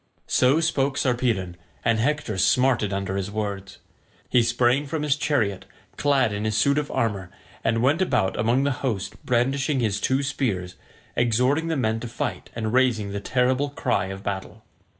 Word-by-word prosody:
So 130 +5 +3
spoke 140 -4 +1
Sarpedon, 115 -9 0 0.3
and 115 -1 +2
Hector 140 -3 0
smarted 110 +3 +3
under 100 0 -2
his 100 0 -3
words. 100 -2 -4 0.5
He 125 - +5
sprang 120 +4 +2
from 150 +1 -3
his 145 -2 +2
chariot 115 -11 0 0.3
clad 135 -6 +2
in 105 +1 -3
his 110 -1 0
suit 140 +4 +3
of 145 - -4
armour, 100 -5 -1 0.3
and 115 +1 +1
went 145 +7 +3
about 95 - +1
among 120 +5 +2
the 140 - +1
host 110 -8 -3
brandishing 135 +3 +1
his 110 -4 0
two 135 +2 +1
spears, 105 -11 -2 0.4
exhorting 125 +7 +2
the 160 -2 -1
men 110 -3 0
to 120 - -6
fight 115 - -4
and 110 -1 -2
raising 120 -6 +2
the 100 - -3
terrible 130 +5 +1
cry 135 - -1
of 95 +1 -7
battle. 95 -1 -5
120 Hz, 170 wpm, -24 LUFS, 105-135 Hz, 0.5 s, He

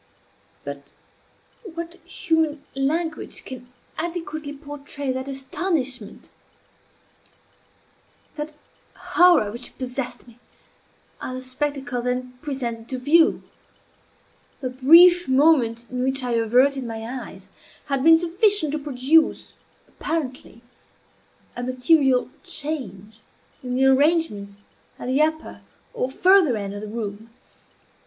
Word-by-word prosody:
But 140 0 -7 0.8
what 335 -4 -7
human 320 -4 -1
language 310 +4 -2
can 250 -1 -10 0.3
adequately 325 -3 -4
portray 285 -1 -6
that 260 +1 -4
astonishment, 270 - -3 2.0
that 300 0 -6 0.4
horror 350 -12 +4
which 240 +3 -9
possessed 255 -1 -5
me 235 0 -18 0.8
at 255 - -5
the 255 0 -6
spectacle 255 -1 -3
then 250 +1 -3
presented 240 -6 -4
to 260 - -3
view? 315 +6 +3 1.2
The 255 -2 -4
brief 340 +7 +7
moment 260 -4 +3
in 250 0 -3
which 265 +1 0
I 245 - -2
averted 250 +4 +3
my 225 -2 -6
eyes 250 +2 -8 0.4
had 275 -2 -1
been 325 +1 +8
sufficient 350 0 +2
to 305 - -2
produce, 290 +3 +2 0.3
apparently, 260 -6 -5 0.9
a 245 - -5
material 255 +1 +2
change 255 - -5 0.4
in 250 -1 -4
the 265 +1 +3
arrangements 265 -9 +1 0.3
at - - -8
the 265 +3 +2
upper 315 0 -1 0.3
or 265 - -2
farther 360 - +4
end 200 -1 -5
of 205 - -7
the 215 - -6
room. 215 0 -6
265 Hz, 110 wpm, -23 LUFS, 245-315 Hz, 2.0 s, been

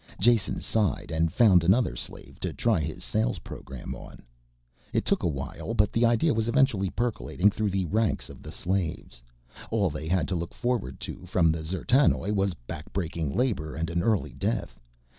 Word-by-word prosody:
Jason 120 -3 +3
sighed 105 -8 0
and 80 0 +1
found 95 -6 +5
another 105 +8 +3
slave - - -9
to - - -2
try 115 -6 +1
his 80 +1 -4
sales 110 +1 0
program 65 -2 -8
on. - - -11 0.7
It - - +1
took - - +2
a - - +1
while, 70 -4 -4
but 105 0 +3
the 115 +1 +4
idea 120 +8 +3
was 110 0 0
eventually 115 -6 +3
percolating 105 -3 +1
through 105 +1 -1
the 95 -1 0
ranks 110 +5 0
of - - -12
the - - -9
slaves. 85 -9 -3 0.5
All 100 -6 +1
they 75 +1 -5
had 85 -2 +1
to 95 - 0
look 85 0 -4
forward 120 - -1
to 90 - -7
from 85 -2 +3
the 80 0 -3
D'zertanoj 100 - +2
was 95 -3 +1
backbreaking 80 -5 -3
labor 105 - 0
and 80 +1 -2
an 85 +1 0
early 105 0 +1
death. - - -2
95 Hz, 180 wpm, -27 LUFS, 80-110 Hz, 0.7 s, found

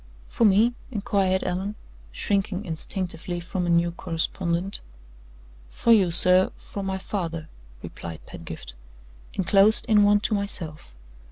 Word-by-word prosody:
"For 230 - +1
me?" 215 +4 +4 0.2
inquired 200 -4 0
Allan, 190 +3 -3 0.4
shrinking 195 - -1
instinctively 175 0 -3
from 180 +1 -3
a - - 0
new 170 0 +3
correspondent. 170 +2 -1 0.9
"For 230 - +1
you, 195 -5 +4
sir 185 +2 +5
from 200 -1 -7
my 190 0 -2
father," 165 -5 -4 0.3
replied 85 -2 -8
Pedgift, 80 -7 -9 0.6
"inclosed 195 +3 +4
in 210 -2 +4
one 205 0 +5
to 215 - 0
myself. 165 - -3
185 Hz, 120 wpm, -25 LUFS, 170-200 Hz, 0.9 s, sir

